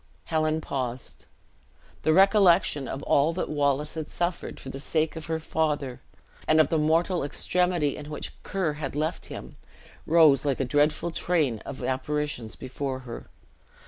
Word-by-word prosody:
Helen 155 -1 0
paused. 125 -4 -4 0.7
The 155 - +2
recollection 185 - +5
of 135 - -5
all 145 +4 +3
that 180 - -3
Wallace 145 0 0
had 160 -2 -5
suffered 175 0 -3
for 130 - -8
the 135 - -6
sake 155 +2 0
of 160 -1 -7
her 160 0 -1
father, 150 -5 -1 0.5
and 155 0 +5
of 155 - +5
the 160 - +2
mortal 165 +3 +2
extremity 175 +1 0
in 150 0 -8
which 150 - -5
Ker 185 -6 -1
had 150 -2 -5
left 155 +3 -2
him, - - -9 0.5
rose 155 -5 +6
like 140 -3 0
a 135 - +1
dreadful 150 +5 +1
train 155 -10 0
of - - -6
apparitions 130 -3 -2
before 130 0 -4
her. 120 -2 -9
150 Hz, 155 wpm, -27 LUFS, 140-160 Hz, 0.7 s, rose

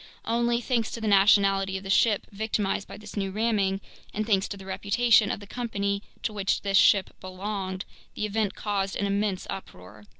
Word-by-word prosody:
Only, 235 +1 +1
thanks 235 -2 0
to - - -4
the 220 - -3
nationality 195 -1 +4
of 190 - -9
the 195 - -3
ship 210 +1 +3
victimized 205 -1 -1
by - - -9
this 210 0 -11
new 195 -2 -1
ramming, 200 -2 0 0.3
and 215 +1 -1
thanks 200 -3 +2
to 200 - -6
the 190 - -11
reputation 205 +3 +3
of - - -2
the 205 - -11
company 200 -3 -2 0.2
to 215 - -2
which 200 -2 -1
this 195 -1 +2
ship 195 -2 +4
belonged, 190 0 -4 0.3
the 215 - -2
event 210 -1 -1
caused 195 -2 -2
an 200 - -1
immense 200 -1 -1
uproar. 105 - -10
200 Hz, 190 wpm, -27 LUFS, 195-215 Hz, 0.3 s, nationality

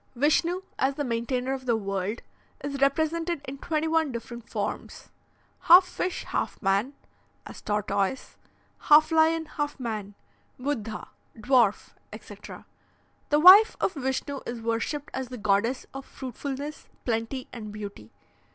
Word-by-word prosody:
"Vishnu, 330 +7 +2 0.2
as 270 +1 +1
the 290 - -2
maintainer 250 +1 -1
of 260 -1 -6
the 235 - +3
world, 200 +1 -3 0.4
is 280 -1 -4
represented 315 +4 +1
in 270 +1 -7
twenty 315 0 -1
one 320 -3 +1
different 235 -1 -8
forms: - - -5 0.5
Half 360 +2 +8
fish 365 - -3
half - - -3
man, 200 +7 +1 0.5
as - - -10
tortoise, 210 +2 -1 0.4
half 305 +2 +6
lion 320 0 +3
half 290 -2 -4
man, 215 -5 -5 0.4
Buddha, 230 -5 -4 0.3
dwarf, 235 -2 +2 0.2
etc. - - -11 0.6
The 295 - +4
wife 385 +7 +9
of - - 0
Vishnu 270 0 -3
is 240 0 -4
worshipped 230 +6 -2
as 260 -1 -3
the 250 0 -8
goddess 210 +4 +1
of 270 0 -6
fruitfulness, 280 +3 -6 0.2
plenty, 230 +2 -2
and 215 -3 -7
beauty. 200 - -8
265 Hz, 135 wpm, -27 LUFS, 225-300 Hz, 0.6 s, wife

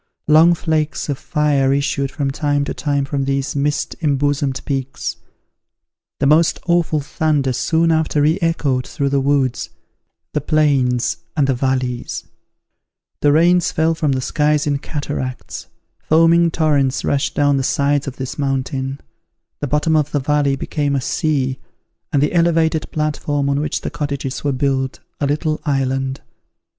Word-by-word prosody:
Long 160 +3 +6
flakes 155 -2 -1
of 140 - -2
fire 145 -3 +1
issued 140 0 0
from 140 -1 -2
time 145 0 0
to - - -3
time 140 -2 -1
from 140 0 -2
these 135 +1 -1
mist 145 +1 -1
embosomed 145 -2 0
peaks. 135 -1 -3 1.0
The 140 - +1
most 155 +3 +4
awful 170 -3 +1
thunder 145 -2 0
soon 165 +6 +1
after 160 -1 +1
re 160 +5 +2
echoed 145 -6 0
through 140 -2 -1
the 140 0 +1
woods, 135 -2 0 0.6
the 150 - 0
plains, 135 -5 +1 0.2
and 145 - +4
the 135 - +2
valleys: 130 -1 -2 1.0
the 145 - +3
rains 175 +3 +4
fell 160 +1 +2
from 155 -4 0
the 130 - -1
skies 150 +2 +1
in 145 -2 0
cataracts; 140 -4 -5 0.3
foaming 165 +2 +4
torrents 145 -5 +1
rushed 140 0 0
down 145 -1 +3
the 135 - 0
sides 140 +2 +1
of 135 - -5
this 130 +2 -6
mountain; 135 0 -2 0.6
the 145 - -2
bottom 150 +3 +1
of 150 -2 +2
the 145 - +1
valley 145 0 +1
became 145 +1 -2
a 135 - 0
sea, 135 -2 -1 0.5
and 140 - +2
the 150 - 0
elevated 165 -2 +2
platform 150 -2 -1
on 140 - +1
which 150 - -2
the - - -4
cottages 140 -2 -4
were 145 - +1
built, 135 -1 -1 0.2
a 145 - 0
little 155 +2 -1
island. 135 -2 -1
145 Hz, 150 wpm, -19 LUFS, 135-155 Hz, 1.0 s, Long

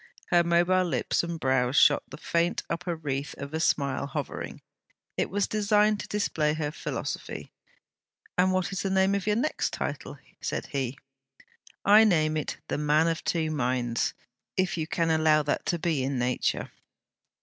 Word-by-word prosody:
Her 175 -1 +5
mobile 175 +2 +3
lips 175 - 0
and 170 -1 -4
brows 130 -2 +1
shot - - +6
the - - -9
faint 170 +1 0
upper 170 +1 -2
wreath 145 -3 -4
of 140 +2 -7
a 160 - -1
smile 140 -3 +1
hovering. 140 - -5 0.5
It - - 0
was 200 0 +1
designed 210 0 +2
to - - -6
display 155 -7 0
her 150 -2 -2
philosophy. - - -5 0.8
'And 185 +1 +3
what 185 0 0
is 195 - -2
the 195 - -1
name 190 +1 +3
of 200 0 -2
your 210 - +3
next?' 280 +7 -1 0.6
said - - -3
he. 135 -2 -2 0.9
'I 210 +2 +8
name 155 -6 +3
it 155 - -3
THE - - -2
MAN 150 +2 +3
OF 165 - -2
TWO 160 -2 0
MINDS, 125 -4 0 0.4
if 185 -1 +1
you 160 -2 -2
can 165 0 0
allow 155 -1 +4
that 145 - -2
to 175 - +1
be 160 -4 0
in 135 +1 -1
nature.' 125 +1 -1
160 Hz, 165 wpm, -27 LUFS, 145-185 Hz, 0.9 s, I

